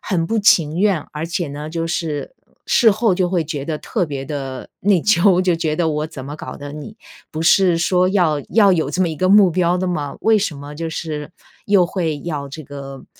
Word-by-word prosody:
很 170 -5 -1
不 225 - 0
情 165 -6 +3
愿。 195 -4 +2
而 155 +2 -4
且 175 -3 -3
呢 145 +2 -6
就 165 +1 -3
是 160 - -3 0.3
事 225 -2 +5
后 215 -2 +1
就 180 -1 0
会 175 -2 0
觉 145 -3 -5
得 155 -1 -3
特 190 -7 -2
别 140 -2 -5
地 135 -2 -6
内 190 -3 +2
疚， 190 -3 +4
就 180 -2 +1
觉 160 -2 -1
得 170 -2 +1
我 150 0 -1
怎 135 -4 -9
么 145 +2 -7
搞 - - -8
的， 145 0 -8
你 150 -1 -9 0.4
不 155 +1 -3
是 175 0 +4
说 180 +2 +2
要 175 -7 +1
要 205 -3 +5
有 165 -3 0
这 185 - 0
么 175 - +1
一 160 - -5
个 185 +4 +1
目 200 -2 +6
标 175 +1 +1
的 185 - -2
吗？ 150 -5 -3
为 220 -1 +4
什 185 -7 -2
么 145 +1 -9
就 165 +2 -4
是 155 -1 -5 0.3
又 200 -3 +4
会 165 -5 -2
要 145 -4 -5
这 155 +3 -8
个 135 -1 -9
165 Hz, 240 characters per minute, -19 LUFS, 150-185 Hz, 0.4 s, 目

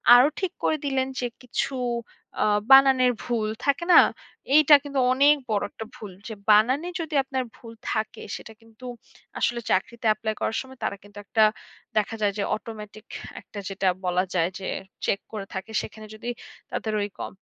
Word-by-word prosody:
আরো 250 +3 +7
ঠিক 375 -3 -1
করে 310 - +2
দিলেন 265 -1 0
যে 245 - 0
কিছু 250 +2 -2 0.7
আ - - +4 0.3
বানানের 265 -2 +7
ভুল 230 -3 -1 0.2
থাকে 280 +4 +2
না? - - +11 0.6
এইটা 305 -1 +8
কিন্তু 280 -2 -2
অনেক 285 +3 +6
বড় 210 -2 +1
একটা 220 - -7
ভুল। 205 -3 -9 0.2
যে 220 - -5 0.2
বানানে 255 +11 +4
যদি 320 -1 -5
আপনার 265 -1 -2
ভুল 230 -1 -11 0.2
থাকে 220 0 -2
সেটা 220 - -10
কিন্তু 225 +2 -15 0.5
আসলে 235 0 +1
চাকরিতে 235 +4 -1
এপ্লাই 220 -1 -3
করার 225 - -1
সময় 265 -1 -12
তারা - - -1
কিন্তু 205 0 -16
একটা 220 +1 +3 0.5
দেখা 215 +2 +1
যায় 200 -1 +2
যে 200 - 0
অটোমেটিক 215 -1 -9 0.4
একটা 205 - -9
যেটা 195 0 -1 0.2
বলা 180 +1 +2
যায় 170 -1 +2
যে 190 - -5 0.4
চেক 200 - +1
করে 205 -3 -5
থাকে। 190 +3 -6
সেখানে 215 0 -9
যদি 235 +2 -6 0.4
তাদের 220 -1 -2
ওই 205 - -2
কম - - -5
225 Hz, 170 wpm, -25 LUFS, 210-265 Hz, 0.7 s, না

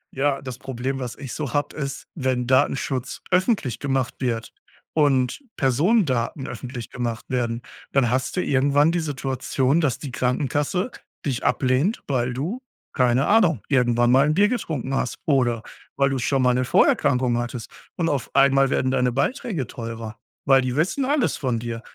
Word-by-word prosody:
Ja. 140 0 +1
Das 130 -2 -7
Problem, 135 +1 -3
was 125 -2 -5
ich 135 -3 -7
so 145 -5 -4
habe, 145 0 -1
ist 140 -2 -5
wenn 130 -4 0
Datenschutz 130 0 0
öffentlich 185 - +1
gemacht 135 -3 -1
wird 115 -3 -2 0.4
und 135 - +2 0.2
Personendaten 135 - +1
öffentlich 125 -3 -7
gemacht 120 -2 -3
werden, 120 -2 -1 0.3
dann 130 -4 +3
hast 130 +7 -1
du - - +3
irgendwann 145 +3 +3
die 175 - 0
Situation, 135 0 0
dass 135 -6 +1
die 140 - -7
Krankenkasse 145 - -1 0.3
dich 130 -4 -2
ablehnt, 130 - +1
weil 125 -3 0
du, 175 - -3 0.3
keine 125 0 +3
Ahnung, 180 - +3
irgendwann 120 -3 +3
mal 135 +3 +5
'n 155 - +2
Bier 205 +3 +4
getrunken 155 - -3
hast 130 - -1
oder 120 -6 +2 0.3
weil 140 0 +2
du 135 - -1
schon 130 +1 +1
mal 125 - +4
'ne 125 +1 +1
Vorerkrankung 125 -2 +3
hattest. 120 -1 -5 0.2
Und, 170 - 0
auf 140 -4 -2
einmal 135 0 +5
werden 130 -1 +1
deine 125 -1 +2
Beiträge 155 - -1
teurer, 115 -1 -7 0.3
weil 135 -1 +5
die 125 -1 -2
wissen 185 - +1
alles 285 -1 +1
von 125 -5 -1
dir. 115 0 -5
135 Hz, 165 wpm, -23 LUFS, 125-145 Hz, 0.4 s, mal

